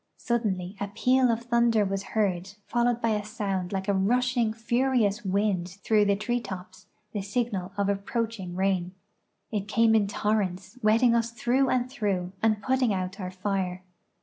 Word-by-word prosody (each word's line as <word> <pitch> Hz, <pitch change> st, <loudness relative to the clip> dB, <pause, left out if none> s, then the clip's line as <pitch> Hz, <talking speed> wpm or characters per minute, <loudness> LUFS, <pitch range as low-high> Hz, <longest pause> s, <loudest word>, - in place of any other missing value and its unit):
Suddenly 205 Hz, -6 st, -1 dB
a 200 Hz, -, -2 dB
peal 250 Hz, +5 st, +3 dB
of 230 Hz, 0 st, 0 dB
thunder 235 Hz, -3 st, +3 dB
was 195 Hz, 0 st, -2 dB, 0.2 s
heard, 190 Hz, -2 st, 0 dB
followed 240 Hz, 0 st, +1 dB
by 230 Hz, -, +3 dB
a 210 Hz, -1 st, 0 dB
sound 195 Hz, -4 st, -3 dB
like 190 Hz, 0 st, -3 dB
a 200 Hz, -, +2 dB
rushing, 240 Hz, +4 st, +2 dB
furious 235 Hz, -1 st, +1 dB
wind 190 Hz, -2 st, 0 dB
through 215 Hz, -2 st, +4 dB
the 200 Hz, 0 st, +3 dB
tree 240 Hz, +4 st, -1 dB
tops, 185 Hz, -3 st, -9 dB, 0.2 s
the 205 Hz, -, -3 dB
signal 200 Hz, -2 st, -2 dB
of 200 Hz, -1 st, +1 dB
approaching 200 Hz, -2 st, -2 dB
rain. 190 Hz, -1 st, 0 dB, 0.6 s
It 205 Hz, -2 st, -2 dB
came 225 Hz, +1 st, +3 dB
in 215 Hz, -2 st, +3 dB
torrents, 200 Hz, 0 st, -1 dB
wetting 230 Hz, +3 st, +4 dB
us 235 Hz, 0 st, +1 dB
through 245 Hz, +3 st, +1 dB
and 250 Hz, -1 st, +1 dB
through, 195 Hz, -8 st, -2 dB
and 215 Hz, -2 st, +2 dB
putting 260 Hz, -3 st, +2 dB
out 185 Hz, +1 st, -3 dB
our 185 Hz, -2 st, -4 dB
fire. 185 Hz, -1 st, -2 dB
210 Hz, 165 wpm, -27 LUFS, 190-235 Hz, 0.6 s, through